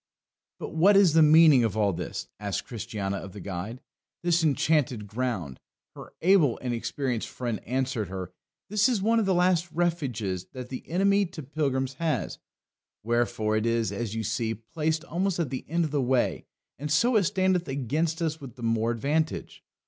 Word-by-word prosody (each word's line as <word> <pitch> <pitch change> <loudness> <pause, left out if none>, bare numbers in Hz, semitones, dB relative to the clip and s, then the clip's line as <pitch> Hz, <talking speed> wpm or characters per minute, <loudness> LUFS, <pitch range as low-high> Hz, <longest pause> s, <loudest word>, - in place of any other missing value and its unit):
"But - - -7
what 190 +5 +5
is 190 -6 +5
the 165 - +6
meaning 155 -4 +7
of 110 -2 -1
all 100 -3 +2
this?" - - -5
asked 100 -2 -3
Christiana 100 -4 -4
of 95 -1 -8
the 100 - -8
guide. 100 +6 -6 0.4
"This 170 -1 +2
Enchanted 140 -6 +1
Ground," 105 - -3 0.4
her - - -11
able 170 -9 +4
and 125 -1 -3
experienced 120 0 -2
friend 120 -4 -4
answered 130 -3 -1
her, 95 -1 -6 0.3
"this 210 +3 +3
is 240 -5 +1
one 225 +4 +2
of 215 - 0
the 190 - +3
last 175 -1 +2
refuges 135 - -1
that 125 -1 -7
the 130 - -7
enemy 200 +3 +3
to 170 -3 -9
pilgrims 135 -2 -1
has; 160 -7 -1 0.6
wherefore 115 -1 0
it 110 +1 0
is, 115 -1 +1
as 115 -2 -4
you 110 - -2
see, 115 +2 -1
placed 155 +8 -2
almost 185 +2 -1
at 160 -6 -1
the 130 - -4
end 170 +1 +1
of 155 - -4
the 145 -2 +1
way, 130 -1 +1 0.3
and 150 +1 -4
so 240 +1 +3
it 205 -4 +4
standeth 185 -1 +1
against 150 +5 -1
us 160 -1 -2
with 130 -3 -9
the 120 - -10
more 115 0 +1
advantage. 145 +7 -2
135 Hz, 180 wpm, -27 LUFS, 115-165 Hz, 0.6 s, meaning